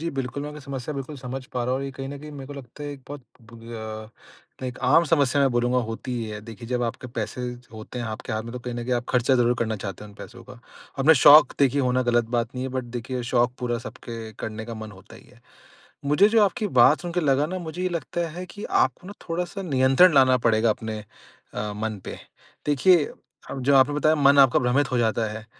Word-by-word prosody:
जी 165 - -2
बिल्कुल 135 +1 -3
मैं 150 - -5
आपकी 150 0 -9
समस्या 135 0 -5
बिल्कुल 140 +2 -6
समझ 130 0 -6
पा 125 -1 -1
रहा 125 - -1
हूँ 130 - 0
और 140 - -4
ये 135 - -4
कहीं 135 0 -7
न 140 +1 -7
कहीं 150 +2 -10
मेरे 135 -2 -8
को 145 - -8
लगता 140 0 -10
है 145 - -4
एक 140 - -11
बहुत 145 0 -7 0.3
बु - - -11
अ 110 -1 -7 0.6
लाइक - - -3
एक 125 -1 -5
आम 150 +6 +5
समस्या 145 -3 +2
मैं 135 - +3
बोलूँगा 120 +1 +2
होती 115 +3 -5
ही 115 - -3
है। 105 -1 -6
देखिए 115 +1 -10
जब 125 -1 -1
आपके 120 +2 -4
पैसे 115 +2 -3 0.3
होते 110 +3 -8
हैं 120 - -3
आपके 110 0 -6
हाथ 110 0 -2
में, 115 +1 -8
तो 125 - -5
कहीं 125 0 -6
न 120 - -4
कहीं 125 - -2
आप 120 0 -2
खर्चा 125 +1 +2
ज़रूर 120 -1 +3
करना 110 -2 -1
चाहते 95 0 -7
हैं - - -11
उन - - -17
पैसों 120 +1 -11
का। 130 -1 -13 0.4
अपने 155 +4 +6
शौक 145 +1 +8
देखिए 140 0 +3
होना 130 -1 +1
गलत 120 -1 +2
बात 115 -1 0
नहीं 125 0 -3
है - - -2
बट 130 - -2
देखिए 125 +1 -4
शौक 120 0 +1
पूरा 120 -2 -2
सबके 115 -2 -8
करने 110 0 -5
का 115 0 -7
मन 110 -1 -8
होता 95 +2 -15
ही - - -16
है। 125 - -21 0.6
मुझे 150 +9 +4
जो 220 0 +4
आपकी 210 +2 -1
बात 145 +6 +6
सुन 175 -1 -5
के 180 - 0
लगा 145 -1 +2
ना 185 +3 -4
मुझे 170 0 -6
ये 185 - +1
लगता 170 0 -3
है 180 0 -6
कि 205 - -8 0.2
आपको 180 - -6
ना 200 - -7 0.2
थोड़ा-सा 175 +3 -3
नियंत्रण 135 +2 +4
लाना 130 -2 +6
पड़ेगा 110 0 +3
अपने 110 0 -4 0.6
अ, 105 0 -3
मन 110 -1 -4
पे। - - -7 0.5
देखिए 150 +3 +4 0.5
अब 135 - -5
जो 140 +2 +3
आपने 135 +2 +4
बताया 155 +1 +3
मन 140 -1 +4
आपका 135 -2 +6
भ्रमित 130 +2 +1
हो 125 - +2
जाता 110 -1 +1
है। 110 0 -8
130 Hz, 250 wpm, -24 LUFS, 115-145 Hz, 0.6 s, शौक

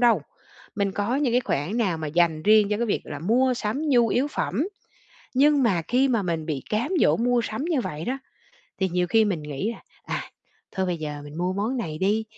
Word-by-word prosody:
đâu. 230 - +4 0.5
Mình 200 -1 0
có 205 +6 0
những 275 -4 +1
cái 250 - +4
khoản 185 - -2
nào 190 -7 +1
mà 155 - -4
dành 160 0 +2
riêng 215 -1 +5
cho 210 - +2
cái 235 - -1
việc 210 - 0
là 145 - -6
mua 250 - +2
sắm 250 +8 -2
nhu 240 -4 +4
yếu 265 +6 +1
phẩm. 285 - -1 0.7
Nhưng 285 +1 +4
mà 185 -8 +2
khi 260 +3 +3
mà 230 -5 +1
mình 165 -4 -2
bị 145 -5 -3
cám 225 - 0
dỗ - - +4
mua 245 +1 +2
sắm 220 +6 -3
như 325 -5 +1
vậy 155 -8 -5
đó, 265 +2 -2 0.6
thì 190 - +2
nhiều 180 0 0
khi 220 +4 +4
mình 185 -7 -1
nghĩ 150 +10 -3
là, - - -13 0.2
à, - - -3 0.5
thôi 190 0 -1
bây 180 -1 -1
giờ 150 -1 -5
mình 145 +2 -9
mua 180 +1 0
món 215 +7 -1
này 155 -10 -4
đi, 210 +3 +1
210 Hz, 230 wpm, -25 LUFS, 170-245 Hz, 0.7 s, riêng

